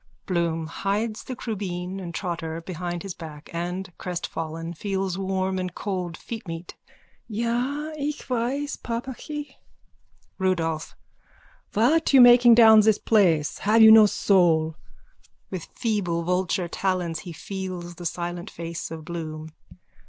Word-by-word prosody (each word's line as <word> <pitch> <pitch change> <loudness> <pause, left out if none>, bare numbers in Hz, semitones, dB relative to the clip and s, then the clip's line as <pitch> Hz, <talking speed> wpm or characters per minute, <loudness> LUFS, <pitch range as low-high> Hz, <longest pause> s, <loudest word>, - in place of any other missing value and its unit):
BLOOM: 170 -3 0
(Hides 210 +7 -2
the 255 - -5
crubeen 190 -5 -4
and 175 -3 -6
trotter 165 -2 -4
behind 175 +1 -5
his 195 -2 -5
back 155 -3 -10
and, 180 +2 -4
crestfallen, 165 -2 -4
feels 190 +1 -2
warm 190 0 -1
and 185 -1 -4
cold 180 -4 -3
feetmeat.) 175 -7 -7 0.5
Ja, 245 +7 -1
ich 295 0 -4
weiss, 255 +4 -1
papachi. 265 +5 -6 0.8
RUDOLPH: 165 -4 -1 0.8
What 290 +9 +3
you 270 - +8
making 240 -1 +8
down 220 -2 +8
this 215 0 +4
place? 170 -9 +2
Have 220 +2 +5
you 220 - +10
no 220 -1 +9
soul? 165 -6 +3 0.8
_(With 185 -4 -5
feeble 195 -8 -1
vulture 180 0 0
talons 175 -2 -1
he 175 - -8
feels 180 0 -6
the 175 +1 -10
silent 175 +2 -4
face 170 0 -6
of 160 -1 -8
Bloom.) 160 -2 -6
185 Hz, 125 wpm, -25 LUFS, 170-220 Hz, 0.8 s, you